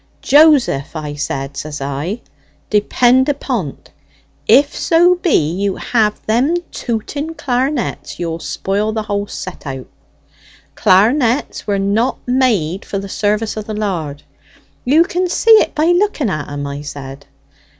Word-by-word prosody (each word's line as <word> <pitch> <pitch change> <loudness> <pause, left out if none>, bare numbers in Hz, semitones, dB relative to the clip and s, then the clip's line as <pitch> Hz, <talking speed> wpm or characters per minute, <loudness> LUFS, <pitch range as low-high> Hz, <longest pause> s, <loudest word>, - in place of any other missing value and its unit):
'Joseph,' 285 - +4
I 150 -2 -4
said, 140 -1 -4
says 150 +1 -5
I, 140 - -4 0.5
'depend 245 +5 +3
upon't, 245 - -3 0.6
if 280 +1 +5
so 345 +2 +4
be 320 - +1
you 195 +2 -1
have 215 -3 0
them 250 +10 +2 0.2
tooting 285 +7 -4
clar'nets 260 -1 -2
you'll 165 -1 -3
spoil 200 +6 -2
the 220 -1 -2
whole 205 -1 -2
set 185 -6 -8
out. 135 -1 -5 0.9
Clar'nets 230 +7 +2
were 200 -1 +1
not 205 +6 0
made 220 -10 +1
for 200 - -4
the 195 0 -5
service 210 +2 -1
of 215 - -4
the 215 -1 -5
Lard; 165 -9 -3 0.6
you 300 +6 +5
can 365 0 -2
see 455 - +2
it 435 -4 +5
by 310 0 +2
looking 350 - +1
at 155 -3 -4
'em,' 145 0 -4
I 140 0 -5
said. 140 -1 -9
210 Hz, 140 wpm, -17 LUFS, 160-265 Hz, 0.9 s, if